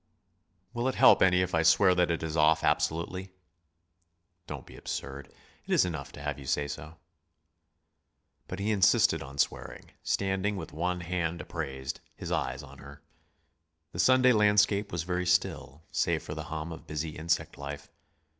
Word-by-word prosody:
"Will 120 +2 -1
it 130 - -1
help - - +6
any 90 -1 +5
if 90 - -4
I 80 - +3
swear 90 +3 +5
that 90 -1 +2
that 85 -1 -2
is 80 -1 -3
off 80 0 +4
absolutely?" 90 +3 -1 1.1
"Don't - - -7
be - - -14
absurd. 70 0 -6 0.4
It - - -6
is - - +4
enough 75 -6 -5
to 70 - -10
have 75 -1 -3
you 70 - -10
say 75 +2 0
so." 80 +2 -8 1.5
But 95 - -5
he 100 +2 -1
insisted 100 -3 +4
on 70 +1 -9
swearing, - - -2
standing 95 +1 0
with 80 -6 -7
one 90 +3 -2
hand 85 -1 -2
upraised, 70 -5 -5 0.2
his - - -7
eyes 70 - -2
on 70 -1 -13
her. 70 +1 -13 0.9
The - - -8
Sunday 130 0 +5
landscape 105 -1 +3
was 85 -2 -2
very 90 +1 -2
still, 80 -4 0
save - - 0
for - - -6
the - - -6
hum 80 +2 -5
of 80 - -10
busy 75 +1 -3
insect 80 +2 -2
life. 70 0 -7
85 Hz, 165 wpm, -29 LUFS, 75-95 Hz, 1.5 s, help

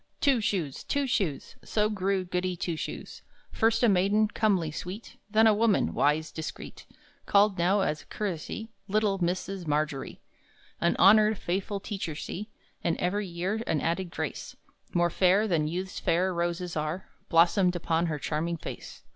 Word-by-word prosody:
Two 270 -5 +3
Shoes, 175 -10 -2
Two 285 0 0
Shoes, 195 - -1
So 210 -1 +1
grew 195 -2 -1
Goody 180 0 -1
Two 170 -1 -3
Shoes! - - -6 0.3
First 225 +2 +2
a - - +6
maiden, 200 +2 +3
comely, 190 -9 +1
sweet; 185 +8 -7
Then 220 +1 +4
a 220 - +6
woman, 215 -1 +2
wise, 150 +2 +1
discreet; 160 +1 -7 0.4
Called 200 -2 +4
now, 190 +4 +3
as 155 -5 -1
a - - -21
courtesy, 210 +3 -4 0.2
Little 205 -1 +1
Mrs. 180 +1 -2
Margery. 150 -2 -1 0.6
An 170 - +2
honored, 215 +2 +6
faithful 195 +3 -2
teacher 195 -6 -4
she! 205 +7 -6 0.3
And 165 - +1
every 200 +3 -1
year 185 +5 -2
an 155 - +1
added 170 +4 -1
grace, - - -5 0.4
More 175 -1 +2
fair 195 +4 +3
than 160 -6 +1
youth's 185 +4 -4
fair 180 +3 +1
roses 175 +1 -2
are, 155 +4 -3 0.2
Blossomed 180 +2 +4
upon 170 0 0
her 155 -2 -2
charming 160 +4 -2
face. - - -8
185 Hz, 155 wpm, -28 LUFS, 170-205 Hz, 0.6 s, a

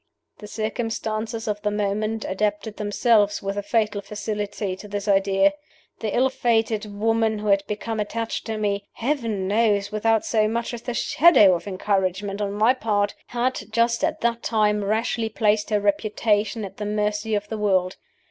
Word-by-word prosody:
"The 210 - -9
circumstances 220 0 -3
of 210 -1 -2
the 210 - 0
moment 210 +1 -1
adapted 210 +2 -2
themselves, 210 0 +2
with 195 0 -2
a 205 - -1
fatal 210 0 0
facility, 205 -2 -4
to 210 - -10
this 205 0 -4
idea. 195 +8 +3 0.5
The 215 -2 -2
ill 260 +1 +3
fated 225 -4 0
woman 220 +1 0
who 210 0 -3
had 200 0 +4
become 220 +1 -3
attached 225 +3 -3
to 220 -1 -2
me 200 -1 -1
(Heaven 230 -7 -2
knows 205 -1 +2
without 220 +1 +1
so 215 -2 +2
much 235 +2 -2
as 235 - -6
the 240 0 -4
shadow 270 - +5
of 175 +3 -3
encouragement 195 +1 -1
on 200 -1 -1
my 220 +4 +4
part!) 210 -5 0
had, 240 -3 -2
just 235 +1 +1
at - - 0
that 235 0 0
time, 210 -2 +1
rashly 225 +2 0
placed 215 -1 +1
her 210 -1 +2
reputation 210 +1 0
at 190 - -10
the 210 - -4
mercy 210 +1 -1
of 205 0 -2
the 220 - -4
world. 190 -3 +1
210 Hz, 170 wpm, -23 LUFS, 205-225 Hz, 0.5 s, shadow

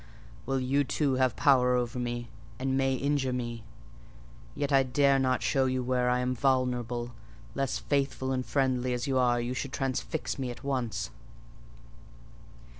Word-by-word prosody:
Well, 135 - +1
you 135 +3 +2
too 140 +1 0
have 130 -3 +2
power 125 -3 +4
over 125 +1 -1
me, 120 -1 -3 0.3
and 130 +1 -1
may 135 0 +2
injure 140 0 0
me: 120 -2 -4 0.9
yet 145 0 -2
I 135 -1 +6
dare 135 +1 +3
not 130 -1 +1
show 135 -1 +2
you 130 0 0
where 125 0 +1
I 125 0 +2
am 125 0 0
vulnerable, 125 -2 0 0.4
lest, 135 -1 -1
faithful 135 -2 0
and 130 -1 0
friendly 130 -2 0
as 125 +1 -2
you 135 -2 +1
are, 120 -1 +3
you 120 +1 -2
should 130 +2 -4
transfix 135 +3 -2
me 130 -2 -2
at 120 - -8
once." 130 -5 -2
130 Hz, 160 wpm, -29 LUFS, 125-135 Hz, 0.9 s, I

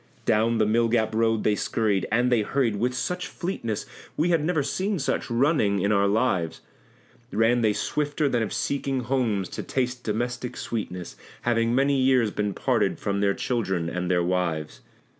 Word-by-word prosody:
Down 115 +1 +2
the 110 - +3
Mill 115 +2 +2
gap 110 -1 +1
road 115 -1 +1
they 105 - +3
scurried 105 -2 0
and 120 +2 +2
they 120 -3 +4
hurried 115 -1 0
with 125 +4 0
such 180 +8 -2
fleetness 115 - -4 0.3
We 165 +3 +2
had 165 -3 +2
never 160 -2 +1
seen 185 +9 -1
such 140 - -2
running 120 -4 +2
in 100 +2 +1
our 100 -1 +3
lives! 100 -7 0 0.7
Ran 115 +3 +3
they 110 -2 +3
swifter 145 +5 -1
than 120 -4 +1
if 110 - -2
seeking 135 -2 -1
homes 120 -7 0
to - - -5
taste 125 -1 -2
domestic 120 +3 -3
sweetness, 90 -6 -5 0.3
Having 115 0 +1
many 135 0 +3
years 130 -4 +3
been 105 -1 -2
parted - - +1
from 100 -1 -2
their 100 -1 +2
children 95 -9 -1
and 90 0 -2
their 90 -1 +2
wives. 85 -4 -2
115 Hz, 175 wpm, -25 LUFS, 100-130 Hz, 0.7 s, they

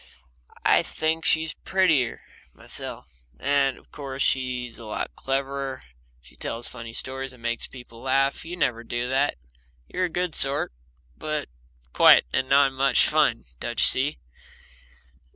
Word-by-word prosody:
I - - +6
think 160 0 -2
she's 160 0 +3
prettier, 160 -10 +1 0.3
myself. - - -4 0.3
And, 140 -2 +2
of - - -21
course, 135 -2 -4
she's 125 -3 -1
a 115 - -10
lot 105 - -4
cleverer. 135 0 -3 0.4
She - - -18
tells 115 +1 -4
funny 115 -2 -8
stories 130 +2 -4
and 120 -2 -17
makes 120 0 -2
people 125 -3 -12
laugh; 135 +1 +1
you 175 +2 -7
never 120 -7 0
do 120 +1 -2
that 135 +2 +2 0.5
You're 185 - -1
a - - -3
good 175 0 -1
sort, 135 - +1 0.4
but 155 - -3 0.4
quiet - - +7
and 130 - 0
not 140 -1 +5
much 135 -2 +4
fun, - - +2
don't 120 -1 -3
you - - +6
see? 140 +4 +2
135 Hz, 145 wpm, -25 LUFS, 125-145 Hz, 0.5 s, quiet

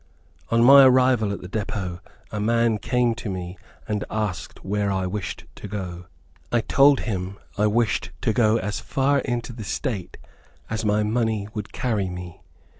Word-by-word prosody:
On 115 0 +3
my 140 +2 +9
arrival 125 -4 +4
at 100 - -5
the 90 - -8
depot, 95 -3 -3 0.3
a 105 - -3
man 115 0 +2
came 125 -1 +1
to 115 -2 -6
me, 90 -1 -5 0.3
and 105 -2 -1
asked 105 -6 -4
where 100 +1 0
I 95 -1 0
wished 95 0 -4
to - - -7
go. 90 -3 -6 0.4
I 120 - +3
told 140 +3 +5
him 95 -3 -3 0.2
I 105 +1 +2
wished 115 0 +1
to 110 - +1
go 110 -2 +3
as 105 -1 -3
far 140 +1 +1
into 120 -2 -3
the 115 -2 -7
State 105 - -4 0.5
as 110 0 -2
my 105 0 +2
money 110 -2 0
would 105 -2 -5
carry 105 -7 -1
me. 90 -1 -8
105 Hz, 170 wpm, -24 LUFS, 95-120 Hz, 0.5 s, my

